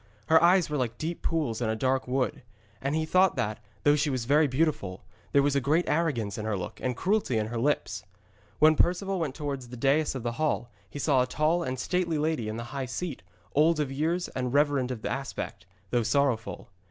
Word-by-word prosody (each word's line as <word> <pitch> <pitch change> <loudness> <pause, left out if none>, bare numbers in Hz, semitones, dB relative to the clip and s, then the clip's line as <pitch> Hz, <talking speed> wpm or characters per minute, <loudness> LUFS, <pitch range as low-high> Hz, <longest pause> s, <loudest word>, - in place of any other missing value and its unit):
Her 160 0 +7
eyes 175 +1 +5
were 150 - -2
like 120 -3 -2
deep 165 +2 -4
pools 145 -9 -1
in 115 - 0
a 110 - 0
dark 130 +3 0
wood. 130 +2 -1 0.4
And 140 +3 -1
he 160 0 0
thought 185 +3 +3
that, 105 +1 -2 0.2
though 145 0 +5
she 145 0 +1
was 130 -4 -2
very 150 +4 +4
beautiful, 130 - -1 0.3
there 140 - +4
was 145 0 +1
great 150 +6 +2
arrogance 125 - 0
in 105 - -4
her 110 -2 -1
look 90 - -6
and 125 -1 -2
cruelty 195 - +1
in 110 - 0
her 120 0 -3
lips. 145 +5 0 0.5
When 155 +1 +6
Perceval 185 +4 +1
went 150 -5 -2
towards 140 -4 -4
the 125 +1 -9
dais 140 +4 +2
of 130 - -4
the 120 - -1
hall 120 -6 0 0.2
he - - -8
saw 140 -3 +3
a 125 - 0
tall 155 +6 +1
and 130 -6 -3
stately 170 +3 0
lady 150 -7 -1
in 110 - -4
the 115 - -4
high 135 -2 -3
seat, 155 - -4 0.3
old 155 +2 +4
of 145 -3 -1
years 165 +6 0
and 125 -1 -3
reverend 145 -2 +2
of 125 -4 -5
aspect, 135 0 -4 0.2
though 120 - +2
sorrowful. 115 -3 0
140 Hz, 215 wpm, -28 LUFS, 125-155 Hz, 0.5 s, Her